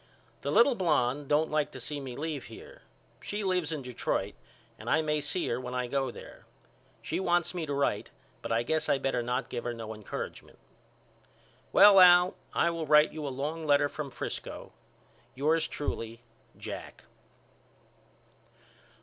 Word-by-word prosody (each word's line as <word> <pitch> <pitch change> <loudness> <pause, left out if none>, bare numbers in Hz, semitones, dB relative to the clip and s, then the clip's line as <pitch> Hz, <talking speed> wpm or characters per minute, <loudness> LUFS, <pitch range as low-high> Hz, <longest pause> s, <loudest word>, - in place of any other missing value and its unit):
The - - -3
little 255 +3 +5
blonde 145 - +1
don't 150 +2 +2
like 150 -1 +1
to 130 - -7
see 145 +4 -4
me 130 -3 -7
leave 150 0 -4
here. 465 +6 -12 0.4
She 205 +1 -4
lives 180 -4 0
in 150 -4 -4
Detroit 125 -2 -2 0.5
and - - -6
I 155 - +3
may 150 -1 0
see 160 +5 -2
her 120 +2 -1
when 125 0 -6
I 125 0 -1
go 135 +1 -1
there. - - -12 0.6
She - - -2
wants 175 -2 +1
me 170 -3 -4
to 145 - -2
write 140 -7 0 0.3
but - - -5
I 115 +1 +2
guess 155 +5 -1
I - - +4
better 135 -2 -1
not 125 +2 -2
give 120 - -4
her 120 -1 -3
no 110 -1 -6
encouragement. 105 -2 -7 1.1
Well 200 0 +8
Al 180 0 +7 0.2
I 170 - +2
will 165 -2 -4
write 150 +1 +5
you 155 -2 -5
a - - -1
long 150 +4 -4
letter 145 0 +4
from 150 -1 -5
Frisco. - - -6 0.6
Yours 155 +4 +2
truly, 115 -5 -5 0.3
JACK. - - -8
150 Hz, 165 wpm, -29 LUFS, 125-165 Hz, 1.1 s, Well